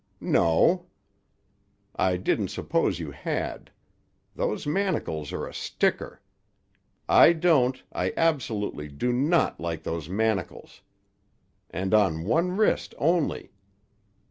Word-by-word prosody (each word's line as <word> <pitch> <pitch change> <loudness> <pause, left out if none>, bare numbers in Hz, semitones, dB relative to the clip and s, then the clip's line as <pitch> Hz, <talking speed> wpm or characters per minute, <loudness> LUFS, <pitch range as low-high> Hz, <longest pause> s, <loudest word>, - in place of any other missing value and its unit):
"No." 80 -1 +2 1.1
"I 90 -1 +1
didn't 90 - 0
suppose - - -1
you - - -6
had. - - -4 0.7
Those 105 - -2
manacles 145 - -1
are - - -4
a - - -9
sticker. - - -2 0.8
I 170 - +7
don't—I 130 - +1
absolutely 115 - -1
do 75 +13 -2
not 150 +7 +1
like 85 -1 -4
those 80 -1 -4
manacles. 105 -1 -2 0.9
And 95 +2 -3
on 95 -7 +3
one 170 - +1
wrist 215 - +1
only! 165 +1 0
110 Hz, 100 wpm, -26 LUFS, -, 1.1 s, I